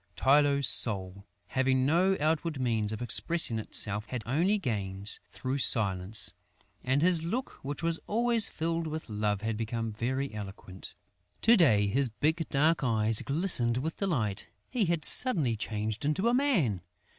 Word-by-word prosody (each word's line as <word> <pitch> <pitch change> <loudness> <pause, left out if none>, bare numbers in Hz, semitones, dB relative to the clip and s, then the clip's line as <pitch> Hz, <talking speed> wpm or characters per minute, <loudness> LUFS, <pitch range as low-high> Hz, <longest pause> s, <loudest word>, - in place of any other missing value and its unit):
Tylô's 140 0 +3
soul, 100 -3 0 0.2
having 130 0 +1
no 180 +6 +2
outward 155 0 -1
means 110 -4 -1
of 110 +2 -5
expressing 120 0 0
itself, 105 -1 -1
had 125 -1 -5
only 170 - +1
gained 100 - -4
through 130 +2 -4
silence; 100 -4 +1 0.5
and 135 +4 +1
his 175 -2 +4
look, 230 +11 -4
which 140 +3 -6
was 165 -1 0
always 230 0 +2
filled 165 0 -3
with 155 -3 -6
love, 105 -1 -1
had 110 0 -2
become 115 0 -4
very 130 +4 -3
eloquent. 95 -3 -9 0.5
To 230 +2 +6
day 120 - +4
his 125 +6 +1
big 155 +9 -1
dark 155 +3 +1
eyes 110 -2 +3
glistened 140 -7 +2
with 160 +5 -4
delight; 115 - -2 0.2
he 245 -5 +1
had 170 -3 0
suddenly 160 - +4
changed 110 +1 -4
into 150 +9 0
a 235 - +2
man! 195 - +1
130 Hz, 150 wpm, -29 LUFS, 110-165 Hz, 0.5 s, To